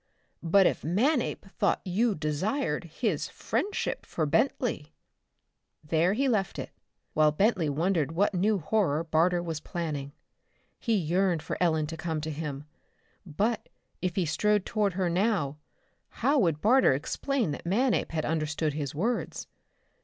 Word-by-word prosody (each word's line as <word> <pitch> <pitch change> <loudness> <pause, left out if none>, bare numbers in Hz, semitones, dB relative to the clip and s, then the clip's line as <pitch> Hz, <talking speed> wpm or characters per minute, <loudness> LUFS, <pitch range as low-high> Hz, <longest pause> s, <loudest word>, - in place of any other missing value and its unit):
But 185 +3 +4
if - - +1
Manape 235 - +1
thought 195 - 0
you 210 +4 +1
desired 155 - -1
his 170 - -2
friendship 410 - -2
for 160 - -2
Bentley...?" 160 - 0 0.9
There 165 +4 +2
he 270 +6 +1
left 210 -7 0
it, - - -5 0.4
while 155 0 +4
Bentley 185 -1 +2
wondered 160 0 0
what 200 +5 +2
new 200 +4 +2
horror 165 -3 +1
Barter 170 +2 +2
was 165 -3 -3
planning. 150 -4 -4 0.7
He 230 -2 +1
yearned 175 -1 +1
for - - -3
Ellen 160 -3 +2
to 165 +2 -6
come 160 -1 -2
to 155 +1 -4
him. 145 -2 -5 0.6
But, 210 +8 -1 0.3
if 180 -2 -1
he 185 - +1
strode 205 +6 +1
toward 205 -3 0
her 185 0 0
now, 175 -6 0 0.5
how 285 +1 +1
would 165 - +1
Barter 245 - +5
explain 230 - -1
that 145 - -6
Manape 235 +8 +1
had 160 -1 -1
understood 155 -1 -1
his 145 -2 -4
words? 225 +10 -2
175 Hz, 145 wpm, -28 LUFS, 155-210 Hz, 0.9 s, Barter